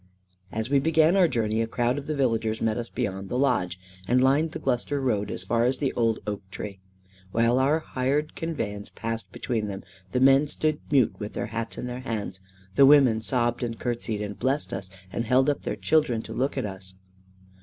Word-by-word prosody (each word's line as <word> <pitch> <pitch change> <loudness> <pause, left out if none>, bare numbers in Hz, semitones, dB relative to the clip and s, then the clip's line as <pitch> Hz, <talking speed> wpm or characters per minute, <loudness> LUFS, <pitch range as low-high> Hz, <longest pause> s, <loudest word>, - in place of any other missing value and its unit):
As 110 +1 -2
we 140 - +5
began 160 +3 +4
our 185 -3 +5
journey, 110 -5 0
a 115 - 0
crowd 120 +4 0
of 140 - -10
the 155 - -1
villagers 115 -5 0
met 110 -1 +1
us 120 0 -4
beyond 95 -1 -3
the 125 - -1
lodge, 95 -10 +1 0.3
and 125 +3 +4
lined 140 +5 +3
the - - -5
Gloucester 135 0 -1
road 105 -6 0
as 90 - -5
far 115 +5 +1
as 125 +2 +2
the 135 -1 -1
old 115 -2 +1
oak 105 -1 -3
tree. 100 0 -7 0.5
While 115 +3 +3
our 140 +4 +3
hired 140 +3 -1
conveyance 110 -11 -4
passed 115 -4 -5
between 110 0 -2
them, 95 -2 -6 0.3
the 125 - +1
men 135 +3 +5
stood 155 +1 0
mute 135 -5 +4
with 105 -1 -5
their - - -2
hats 115 0 -4
in - - -4
their 125 0 -5
hands, 105 -7 -4 0.3
the 135 +7 +7
women 135 -6 +6
sobbed 120 0 0
and 115 -2 -3
curtseyed, 115 -3 -2
and 105 0 -6
blessed 135 +4 0
us, 95 -1 -5 0.2
and 115 - -1
held 130 +4 +4
up 145 - -4
their - - -3
children 140 -8 +1
to - - -8
look 135 +3 -1
at - - 0
us. 95 -1 -7
120 Hz, 210 wpm, -26 LUFS, 110-135 Hz, 0.5 s, the